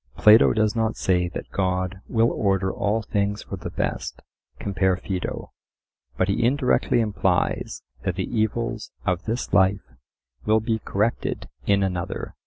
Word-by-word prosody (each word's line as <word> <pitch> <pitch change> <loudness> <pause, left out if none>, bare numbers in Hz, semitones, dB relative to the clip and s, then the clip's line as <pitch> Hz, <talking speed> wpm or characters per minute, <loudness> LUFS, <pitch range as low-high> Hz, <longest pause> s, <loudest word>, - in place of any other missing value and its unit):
Plato 110 +2 +7
does 110 0 +1
not 110 -1 0
say 90 -2 +1
that 85 - -7
God 95 0 -1
will 115 0 +2
order 95 -2 +1
all 105 +2 0
things 105 0 -1
for - - -6
the 85 - -6
best - - -3 0.3
(compare 95 -2 +1
Phaedo), 95 -1 -4 0.7
but - - +2
he - - +1
indirectly 125 -1 +2
implies 95 -4 0 0.2
that - - -2
the - - -1
evils 110 +1 -1 0.2
of 90 -2 0
this 115 +3 -3
life 95 -8 +3 0.5
will 110 +1 +3
be 110 0 -1
corrected 105 +2 -1 0.2
in 100 -1 +3
another. 90 -2 -3
100 Hz, 145 wpm, -24 LUFS, 95-110 Hz, 0.7 s, Plato